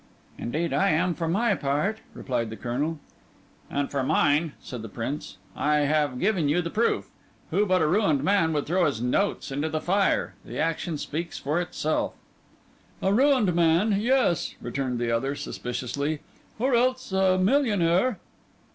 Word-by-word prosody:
"Indeed, 155 +6 -2
I 140 - +3
am 170 +3 +2
for 165 0 -3
my 205 +6 +2
part," 165 +7 -1 0.2
replied 120 -4 -2
the 110 - -6
Colonel. 140 +7 -2 0.7
"And 140 0 -2
for 140 - 0
mine," 150 +2 +2
said 125 -3 -7
the 115 - -7
Prince, 120 +6 -5 0.2
"I 150 0 +2
have 145 -3 +1
given 185 -7 +1
you 160 +4 +2
proof. 210 +8 0 0.4
Who 210 +1 +2
but 185 -3 +3
a - - +3
ruined 160 -6 +2
man 190 -2 +3
would 145 -1 -1
throw 175 +2 +2
his 140 -7 -2
notes 135 - 0
into 145 +4 -1
the 155 - -1
fire? 195 +4 +1
The - - -8
action 165 0 -1
speaks 165 +4 -4
for 150 +5 -1
itself." 155 -3 -2 0.8
"A 190 - +1
ruined 255 -6 +4
man—yes," 195 +6 +2
returned 125 0 -3
the 120 0 -1
other 135 +5 0
suspiciously, 140 +5 -3 0.4
"or 255 +4 +1
else 255 0 +1
a 190 -1 +3
millionaire." 205 -1 +2
165 Hz, 155 wpm, -26 LUFS, 140-195 Hz, 0.8 s, ruined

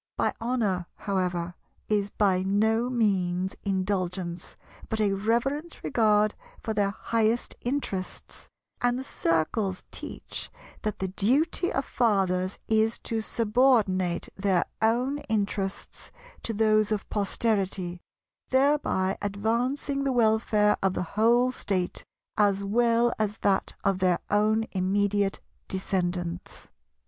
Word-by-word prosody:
By - - +1
"honour," 215 -7 0
however, 180 -3 -2 0.3
is 205 -1 +1
by 195 -3 +2
no 220 +5 +2
means 190 -6 0
mean 195 -2 0
"indulgence," 185 -2 -3 0.3
but 220 - -1
a 205 -2 +2
reverent 240 - -1
regard 215 -4 +3 0.3
for 220 - -2
their 205 -2 +2
highest 225 +2 0
interests: 240 -8 -4 0.3
and 245 0 +2
the 260 - -4
Circles 185 - -1
teach - - -6 0.3
that 215 -1 -2
the 190 - -2
duty 280 - +1
of 270 - -1
fathers 190 -5 +1
is 220 +1 +2
to 225 -1 -1
subordinate 215 -6 +2
their 190 -3 +1 0.2
own 245 +6 +2
interests 200 -2 -2 0.3
to - - -3
those 215 -1 +3
of 210 -2 -1
posterity, 195 -4 -1 0.5
thereby 260 -9 +2
advancing 235 +8 -1
the 275 - +1
welfare 220 -3 +3
of 195 -1 +1
the - - -1
whole 235 +4 +4
State 185 -7 -2 0.3
as 200 -1 +3
well 235 +3 +3
as 215 0 -1
that 195 -1 +1
of 195 -1 +1
their 180 -2 +3
own 215 +2 +3
immediate 200 +1 +1 0.3
descendants. 180 -2 -3
210 Hz, 115 wpm, -27 LUFS, 190-230 Hz, 0.5 s, whole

